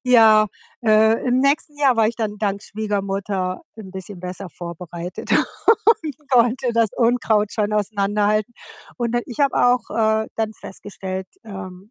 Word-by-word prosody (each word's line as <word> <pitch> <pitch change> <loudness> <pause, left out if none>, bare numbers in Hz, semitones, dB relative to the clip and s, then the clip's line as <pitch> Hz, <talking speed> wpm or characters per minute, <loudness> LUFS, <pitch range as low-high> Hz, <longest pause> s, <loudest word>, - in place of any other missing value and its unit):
ja, 220 -3 +6 0.4
äh, 220 +2 +4
im 250 +1 +3
nächsten 290 +2 +1
Jahr 270 -5 +3
war 220 -1 +4
ich 235 - -5
dann 210 -2 -3
dank 200 -1 -1
Schwiegermutter 195 -3 -3
‘n 200 -4 -10
bisschen 190 -1 -8
besser 185 +1 -6
vorbereitet 175 +1 -7 0.6
und 305 - +1
konnte 245 0 +3
das 230 -2 +2
Unkraut 230 -3 +2
schon 210 -1 -1
auseinanderhalten. 210 +1 0 0.4
Und 240 -2 -2
dann 240 - +1
ich 250 +4 -7
habe 280 -1 +3
auch, 245 0 +2
äh, 220 0 +1
dann 220 -1 -1
festgestellt, 190 -2 -7 0.2
ähm, 190 0 -9
215 Hz, 145 wpm, -21 LUFS, 195-235 Hz, 0.6 s, ja